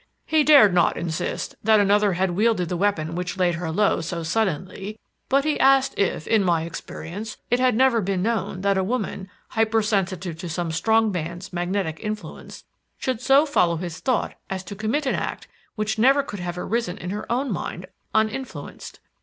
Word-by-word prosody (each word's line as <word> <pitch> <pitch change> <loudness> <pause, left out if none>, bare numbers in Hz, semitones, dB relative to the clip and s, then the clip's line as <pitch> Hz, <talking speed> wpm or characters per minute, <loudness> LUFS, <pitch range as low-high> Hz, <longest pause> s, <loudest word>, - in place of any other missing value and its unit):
He 315 -1 +3
dared 285 -11 +7
not 175 -1 +3
insist 160 -2 -3
that 220 0 +5
another 205 0 +3
had 185 +1 0
wielded 195 -2 +1
the 180 - -1
weapon 170 -4 0
which 180 +2 -4
laid 180 -2 +2
her 170 -1 -4
low 200 +5 +2
so 170 +1 -4
suddenly, 190 +3 -2 0.3
but 275 +1 +3
he 305 0 0
asked 270 0 +4
if, 195 -5 0
in 220 -3 +3
my 170 -3 +2
experience, 175 +5 -7
it 245 - +3
had 255 -2 +3
never 250 -2 +4
been 190 -1 -1
known 220 -4 -1
that 200 -1 +2
a - - +1
woman, 195 -3 -3 0.2
hyper 225 0 +1
sensitive 185 -5 -1
to 175 - -5
some 165 +1 -2
strong 220 +6 +2
man's 175 +1 -5
magnetic 175 -2 -2
influence, 210 -6 -7 0.3
should 255 -3 -2
so 275 +3 +5
follow 180 - +2
his 170 -1 -5
thought 255 -3 0 0.2
as 190 -1 -4
to 200 - -8
commit 225 +9 -1
an 265 - +1
act - - -4 0.3
which 215 +1 -2
never 270 +4 +5
could 205 -7 -7
have 175 0 -4
arisen 215 0 -2
in 180 - -5
her 210 +3 -5
own 255 +1 0
mind, 180 -1 -4 0.3
uninfluenced. 220 +5 -3
200 Hz, 185 wpm, -23 LUFS, 175-225 Hz, 0.3 s, dared